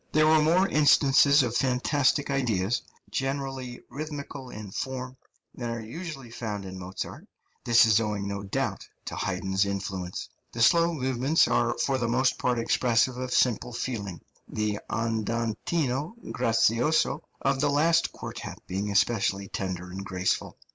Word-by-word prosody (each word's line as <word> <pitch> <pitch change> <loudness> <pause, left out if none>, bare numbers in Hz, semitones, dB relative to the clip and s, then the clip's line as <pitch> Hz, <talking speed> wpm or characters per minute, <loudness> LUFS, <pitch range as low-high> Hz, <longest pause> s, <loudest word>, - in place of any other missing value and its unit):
There 155 0 +5
are 155 0 +5
more 175 +5 +4
instances 145 -2 +5
of 120 -1 -2
fantastic 135 +3 +1
ideas, 120 -5 0 0.3
generally 135 -2 -3
rhythmical 145 -3 -6
in 105 -4 -8
form, 130 +3 -4 0.4
than 120 -2 -5
are 115 0 -3
usually 135 +1 -7
found 105 -4 -5
in 95 0 -7
Mozart; 95 +1 -7 0.4
this 120 0 +6
is 110 -1 +4
owing, 105 -3 -2
no 100 0 -3
doubt, 100 -1 -3 0.2
to - - -5
Haydn's 95 0 0
influence. 95 -2 -4 0.3
The 115 - +1
slow 170 +5 +5
movements 130 +3 +2
are - - +1
for 135 -1 0
the 120 - 0
most 125 +2 +1
part 125 -1 +1
expressive 120 +1 +2
of 130 0 -4
simple 125 0 +2
feeling, 105 -7 -4 0.3
the 105 -1 -2
andantino 115 - -1 0.2
grazioso 120 +7 +2 0.2
of 135 -1 +1
the 145 - +3
last 165 +4 +3
quartet - - -7
being 100 +3 -3
especially 100 -1 +1
tender 90 -3 -4
and 95 +1 -6
graceful. 95 -1 -2
120 Hz, 140 wpm, -27 LUFS, 105-140 Hz, 0.4 s, this